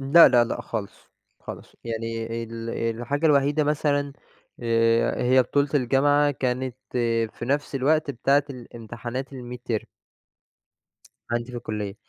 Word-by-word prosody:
إمم، 135 Hz, +1 st, -6 dB
لا، 170 Hz, 0 st, +10 dB
لا، 120 Hz, -2 st, +5 dB
لأ، 120 Hz, -, -3 dB
خالص، 105 Hz, -3 st, -6 dB, 0.3 s
خالص -, -, -10 dB
يعني 115 Hz, 0 st, -3 dB, 0.2 s
ال 115 Hz, 0 st, -6 dB, 0.3 s
الحاجة 145 Hz, +6 st, 0 dB
الوحيدة 145 Hz, 0 st, +3 dB
مثلًا 145 Hz, -1 st, 0 dB, 0.5 s
آآ، 115 Hz, 0 st, +2 dB
هي 130 Hz, +1 st, +5 dB
بطولة 140 Hz, +3 st, +1 dB
الجامعة، 145 Hz, +2 st, +3 dB
كانت 130 Hz, -1 st, -2 dB, 0.6 s
في -, -, -7 dB
نَفس 140 Hz, +3 st, -1 dB
الوقت 145 Hz, +3 st, +2 dB
بتاعة 140 Hz, +3 st, +2 dB
الامتحانات 120 Hz, +1 st, -7 dB
الميدترم. 125 Hz, -3 st, -4 dB, 1.4 s
عَندي 120 Hz, +1 st, -2 dB
في -, -, -5 dB
الكلية. 105 Hz, -3 st, -4 dB
125 Hz, 125 wpm, -25 LUFS, 115-140 Hz, 1.4 s, لا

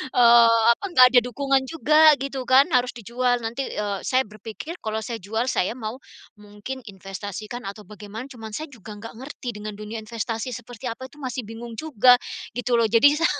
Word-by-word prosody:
eee, 235 Hz, -1 st, +6 dB
apa, -, -, -8 dB
nggak 255 Hz, -7 st, +8 dB
ada -, -, +10 dB
dukungan 270 Hz, +2 st, 0 dB
juga 310 Hz, 0 st, +5 dB
gitu 270 Hz, -1 st, -4 dB
kan. 265 Hz, +3 st, +6 dB
Harus 250 Hz, 0 st, +2 dB
dijual 245 Hz, +2 st, 0 dB
nanti, 235 Hz, +4 st, -3 dB
eee, 205 Hz, -2 st, -2 dB
saya 260 Hz, 0 st, +3 dB
berpikir, 220 Hz, -, -8 dB
kalau 220 Hz, 0 st, -2 dB
saya 230 Hz, -1 st, -5 dB
jual 220 Hz, +6 st, -2 dB
saya 180 Hz, -, 0 dB
mau, 225 Hz, -2 st, -5 dB, 0.4 s
mungkin 210 Hz, +5 st, -8 dB
investasikan 205 Hz, +4 st, -7 dB
atau 200 Hz, +2 st, -8 dB
bagaimana, 210 Hz, +2 st, -8 dB
cuman 225 Hz, -4 st, -9 dB
saya 310 Hz, -, -5 dB
juga 225 Hz, -4 st, -12 dB
enggak 225 Hz, +1 st, -9 dB
ngerti 260 Hz, 0 st, -7 dB
dengan 210 Hz, 0 st, -6 dB
dunia 210 Hz, +2 st, -7 dB
investasi 225 Hz, +2 st, -4 dB
seperti 240 Hz, +1 st, -9 dB
apa 250 Hz, +3 st, -7 dB
itu 295 Hz, -, -20 dB
masih 255 Hz, -1 st, -3 dB
bingung 230 Hz, +1 st, -8 dB
juga, 250 Hz, -5 st, +5 dB, 0.4 s
gitu 245 Hz, 0 st, 0 dB
loh, 230 Hz, -, +3 dB
jadi 235 Hz, +7 st, +5 dB
sa 330 Hz, -, +2 dB
235 Hz, 185 wpm, -24 LUFS, 215-260 Hz, 0.4 s, ada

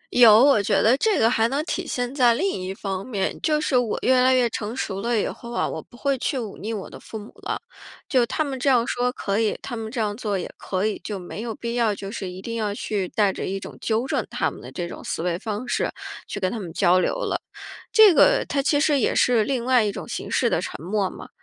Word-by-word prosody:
有， 230 Hz, -2 st, +8 dB
我 275 Hz, -7 st, +5 dB
觉 -, -, +2 dB
得 230 Hz, +4 st, +5 dB
这 425 Hz, +8 st, +2 dB
个 225 Hz, -, +4 dB
还 225 Hz, -1 st, +3 dB
能 275 Hz, +5 st, -1 dB
体 360 Hz, -1 st, -3 dB
现 245 Hz, 0 st, -2 dB
在 245 Hz, -4 st, +4 dB
另 365 Hz, +11 st, 0 dB
一 185 Hz, -, -4 dB
方 195 Hz, -1 st, -4 dB
面， 205 Hz, -6 st, -1 dB
就 305 Hz, -1 st, +2 dB
是 300 Hz, -3 st, 0 dB
我 240 Hz, -3 st, 0 dB
越 255 Hz, 0 st, +4 dB
来 260 Hz, +1 st, +5 dB
越 250 Hz, -2 st, +3 dB
成 215 Hz, +2 st, -4 dB
熟 195 Hz, -6 st, -3 dB
了 235 Hz, 0 st, +1 dB
以 -, -, 0 dB
后 235 Hz, -1 st, -7 dB
啊， 235 Hz, -, 0 dB
我 -, -, -5 dB
不 240 Hz, -, -18 dB
会 280 Hz, +2 st, +1 dB
去 270 Hz, +2 st, -1 dB
忤 220 Hz, -5 st, -5 dB
逆 220 Hz, -, -4 dB
我 210 Hz, -4 st, -4 dB
的 -, -, -11 dB
父 220 Hz, -, -8 dB
母 210 Hz, 0 st, -10 dB
了。 -, -, -2 dB, 0.5 s
就 260 Hz, -8 st, +3 dB
他 315 Hz, +4 st, 0 dB
们 275 Hz, -3 st, -4 dB
这 275 Hz, -, +2 dB
样 245 Hz, -3 st, +4 dB
说 245 Hz, +1 st, 0 dB
可 200 Hz, -4 st, -2 dB
以、 220 Hz, -2 st, +1 dB
他 240 Hz, -, -5 dB
们 220 Hz, -1 st, -5 dB
这 245 Hz, -, -4 dB
样 210 Hz, -2 st, 0 dB
做 210 Hz, -4 st, -2 dB
也 -, -, -4 dB
可 190 Hz, +1 st, -2 dB
以， 215 Hz, -, -1 dB
就 210 Hz, -, -4 dB
没 180 Hz, +3 st, -7 dB
有 230 Hz, -1 st, -4 dB
必 235 Hz, 0 st, -4 dB
要 230 Hz, -4 st, +1 dB
就 195 Hz, 0 st, -7 dB
是 195 Hz, -5 st, -5 dB
一 185 Hz, +1 st, -9 dB
定 230 Hz, +1 st, -4 dB
要 210 Hz, -2 st, -1 dB
去 205 Hz, -3 st, -2 dB
带 205 Hz, -3 st, +2 dB
着 -, -, -4 dB
一 195 Hz, +1 st, -2 dB
种 -, -, -9 dB
纠 225 Hz, +2 st, 0 dB
正 -, -, 0 dB
他 -, -, -1 dB
们 -, -, -11 dB
的 -, -, -10 dB
这 175 Hz, -2 st, -4 dB
种 -, -, -9 dB
思 -, -, -3 dB
维 175 Hz, -1 st, -1 dB
方 215 Hz, +3 st, -4 dB
式 -, -, 0 dB, 0.4 s
去 -, -, -5 dB
跟 185 Hz, -2 st, 0 dB
他 235 Hz, -, -4 dB
们 180 Hz, -5 st, -6 dB
交 185 Hz, 0 st, +4 dB
流 -, -, +1 dB
了。 -, -, -2 dB, 0.5 s
这 435 Hz, -4 st, +8 dB
个 -, -, +5 dB
它 275 Hz, -, 0 dB
其 290 Hz, +1 st, +2 dB
实 290 Hz, -2 st, +3 dB
也 -, -, +1 dB
是 240 Hz, -3 st, +4 dB
另 255 Hz, -1 st, -2 dB
外 255 Hz, -2 st, +4 dB
一 210 Hz, -, 0 dB
种 -, -, -7 dB
形 -, -, -5 dB
式 -, -, +2 dB
的 -, -, +1 dB
沉 -, -, -6 dB
默 195 Hz, +1 st, 0 dB
嘛， -, -, -11 dB
230 Hz, 290 characters per minute, -24 LUFS, 205-255 Hz, 0.5 s, 有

